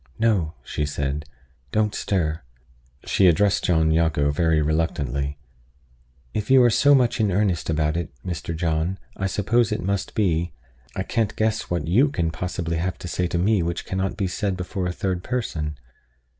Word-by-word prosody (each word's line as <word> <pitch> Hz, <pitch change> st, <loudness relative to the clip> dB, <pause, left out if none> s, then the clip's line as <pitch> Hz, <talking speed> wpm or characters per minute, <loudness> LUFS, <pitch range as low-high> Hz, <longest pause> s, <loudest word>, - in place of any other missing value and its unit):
"No," 100 Hz, -9 st, +1 dB
she 75 Hz, -, -3 dB
said. 70 Hz, 0 st, -2 dB, 0.5 s
"Don't 105 Hz, -1 st, +1 dB
stir." 80 Hz, -5 st, -1 dB, 0.6 s
She 95 Hz, -, +4 dB
addressed 100 Hz, +4 st, +3 dB
John 80 Hz, -3 st, +3 dB
Jago 80 Hz, -3 st, +2 dB
very 80 Hz, +1 st, +2 dB
reluctantly: 75 Hz, -3 st, -1 dB, 1.0 s
"If 105 Hz, 0 st, -3 dB
you 130 Hz, -1 st, +7 dB
are 120 Hz, -, +5 dB
so 145 Hz, +6 st, +5 dB
much 125 Hz, -2 st, +2 dB
in 105 Hz, -3 st, +2 dB
earnest 95 Hz, -4 st, 0 dB
about 75 Hz, -1 st, +1 dB
it, 85 Hz, -1 st, -2 dB, 0.2 s
Mr. 85 Hz, -2 st, -4 dB
John, 80 Hz, +2 st, 0 dB, 0.2 s
I 95 Hz, -, -1 dB
suppose 110 Hz, +4 st, +1 dB
it 105 Hz, -, -2 dB
must 100 Hz, +1 st, -2 dB
be. 85 Hz, -5 st, +1 dB, 0.4 s
I 95 Hz, -, -1 dB
can't 110 Hz, 0 st, -1 dB
guess 110 Hz, 0 st, 0 dB
what 85 Hz, -3 st, -1 dB
you 120 Hz, -, +4 dB
can 85 Hz, -, -1 dB
possibly 85 Hz, -1 st, -3 dB
have 90 Hz, +2 st, -2 dB
to -, -, -7 dB
say 90 Hz, +1 st, -1 dB
to 85 Hz, -, -2 dB
me 100 Hz, +2 st, +3 dB
which 85 Hz, 0 st, -2 dB
cannot 95 Hz, 0 st, -2 dB
be 100 Hz, -, 0 dB
said 95 Hz, +1 st, -2 dB
before 90 Hz, 0 st, -3 dB
a -, -, -1 dB
third 90 Hz, 0 st, -2 dB
person. 80 Hz, -, -3 dB
90 Hz, 170 wpm, -24 LUFS, 80-105 Hz, 1.0 s, you